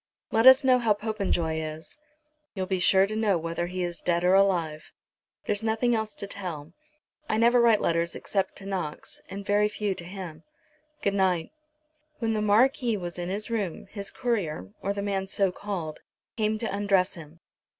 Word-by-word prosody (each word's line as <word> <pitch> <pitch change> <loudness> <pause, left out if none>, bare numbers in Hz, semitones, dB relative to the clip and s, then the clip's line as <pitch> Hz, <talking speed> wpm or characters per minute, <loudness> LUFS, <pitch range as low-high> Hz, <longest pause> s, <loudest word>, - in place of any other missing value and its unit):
"Let 225 +3 +4
us 260 +2 +9
know 255 -1 +5
how 225 -3 +3
Popenjoy 200 -7 -1
is." 155 0 -7 0.6
"You'll 190 -1 -2
be 185 0 -1
sure 190 +1 +5
to 215 +2 -5
know 215 -4 +2
whether 165 +1 -3
he 185 0 -3
is 175 -2 -4
dead 170 0 +1
or 180 +1 +4
alive. 175 -6 +2 0.5
There's 205 +1 -1
nothing 225 +2 +1
else 220 -1 -2
to - - -4
tell. 175 -7 -6 0.6
I 215 - +1
never 235 +2 +5
write 230 -3 +5
letters 170 0 0
except 195 -2 -2
to 195 - -10
Knox, 185 -6 -5
and 200 +1 -7
very 205 +1 +3
few 210 -1 -2
to 180 - -6
him. 175 -3 -8 0.6
Good 200 - +2
night." 185 -4 +1 0.7
When 225 -2 -1
the 215 - 0
Marquis 230 +2 +3
was 175 -2 -6
in 175 0 -3
his 210 +4 -4
room, 205 -7 -2
his 200 -2 -5
courier, 170 - -2
or 200 - -1
the 200 0 -3
man 195 -1 -1
so 195 -1 +1
called, 180 -6 -5 0.4
came 215 -1 0
to 215 -2 -3
undress 200 -2 +2
him. 165 -1 -12
195 Hz, 180 wpm, -27 LUFS, 175-215 Hz, 0.7 s, us